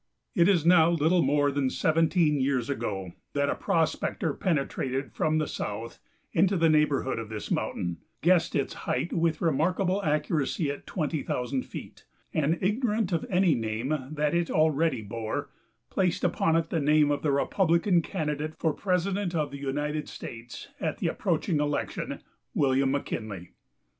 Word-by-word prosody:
It 170 +2 +4
is 175 -6 +3
now 170 -2 +6
little 170 +1 +3
more 145 0 +2
than 140 -1 0
seventeen 160 0 +2
years 130 -1 0
ago 100 -8 -3 0.2
that 140 0 +1
a - - -1
prospector 160 -1 0
penetrated 140 -5 -1
from 155 0 +1
the 155 - +1
south 110 -3 -5 0.3
into 190 +3 +3
the 165 -1 +4
neighborhood 145 -5 +2
of 110 -2 -6
this 110 -1 -6
mountain, 85 -1 -1 0.2
guessed 175 0 +3
its 140 -3 0 0.2
height 170 - 0
with 165 -1 +1
remarkable 180 +5 +1
accuracy 150 -1 0
at 140 - -9
twenty 155 -3 -2
thousand 125 +1 -2
feet, - - -9 0.3
and, 155 +2 +1
ignorant 215 0 0
of 165 -2 -1
any 180 -2 +4
name 115 +3 -2 0.2
that 150 0 0
it 170 -1 +1
already 155 -5 +2
bore, 110 +1 -4 0.4
placed 185 -3 0
upon 165 -2 +2
it 165 0 0
the 165 - +1
name 150 0 +4
of 145 -1 0
the 150 - +1
Republican 170 +4 +2
candidate 155 -3 -3
for 160 -2 +1
President 185 0 -1
of 150 -3 0
the 140 - -7
United 145 +2 -2
States 115 +1 -9
at - - -2
the - - -1
approaching 155 - 0
election 145 0 -2 0.3
William 135 -1 +3
McKinley. 110 -9 -4
150 Hz, 155 wpm, -28 LUFS, 135-170 Hz, 0.4 s, now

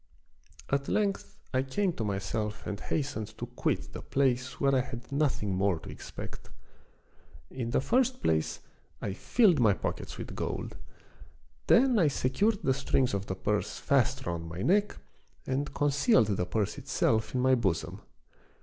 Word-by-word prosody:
At 140 0 +1
length 200 -2 -1 0.2
I 130 - +3
came 175 +8 0
to 115 - -3
myself 105 +1 -3
and 100 - -4
hastened 110 -8 -3
to 120 - -4
quit 125 +1 -2
the - - -6
place 130 -2 0
where 140 0 +3
I 130 - +4
had 125 +1 -8
nothing 140 -9 0
more 95 -1 +2
to 80 - -9
ex - - -10
pect. - - -8 1.0
In 120 -3 -3
the 125 - +2
first 255 - +1
place 80 -1 +1 0.4
I 100 - -3
filled 190 - +3
my 110 -4 +5
pockets - - -4
with - - -6
gold; - - -3 0.9
then 250 -2 +5
I 165 - +5
secured 170 - +1
the 135 - +3
strings 135 -2 +1
of 100 +1 -2
the 95 - -2
purse 95 - -1
fast - - +1
round 85 -1 -3
my 85 +4 -5
neck 205 +3 +2 0.5
and 135 +2 -1
concealed 145 - +3
the 90 -1 -1
purse 105 0 -1
itself 110 +2 0
in 125 - +2
my 130 +1 +4
bosom. 100 -9 0
130 Hz, 160 wpm, -30 LUFS, 105-145 Hz, 1.0 s, my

